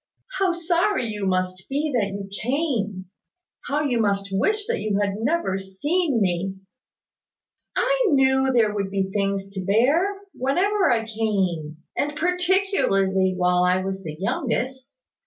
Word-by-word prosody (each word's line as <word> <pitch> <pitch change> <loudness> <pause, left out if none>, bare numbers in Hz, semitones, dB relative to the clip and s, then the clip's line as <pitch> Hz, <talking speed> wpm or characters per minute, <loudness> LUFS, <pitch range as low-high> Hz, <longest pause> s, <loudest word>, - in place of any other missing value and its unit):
"How 385 -2 +3
sorry 345 - +1
you 210 -2 -3
must 185 -1 -1
be 290 +2 -1
that 225 -5 +2
you 200 0 -6
came! 235 - -1 0.6
How 295 +2 0
you 250 -5 0
must 200 -1 0
wish 420 - +1
that 475 +1 -1
you 210 -2 0
had 200 -1 0
never 230 - 0
seen 280 - 0
me!" 190 -1 0 1.2
"I - - +2
knew 265 -4 +3
that 265 - +1
there 220 -4 +3
would 200 -2 -2
be 190 -1 -1
things 195 -1 -1
to 195 -1 -5
bear, 295 - +2
whenever 370 +10 +1
I 225 -2 +1
came; 190 -9 -1 0.2
and 295 +1 -1
particularly 345 - +1
while 180 0 +3
I 180 +1 +2
was 190 0 -4
the 155 -4 -7
youngest. 255 +4 -2
220 Hz, 145 wpm, -23 LUFS, 195-305 Hz, 1.2 s, How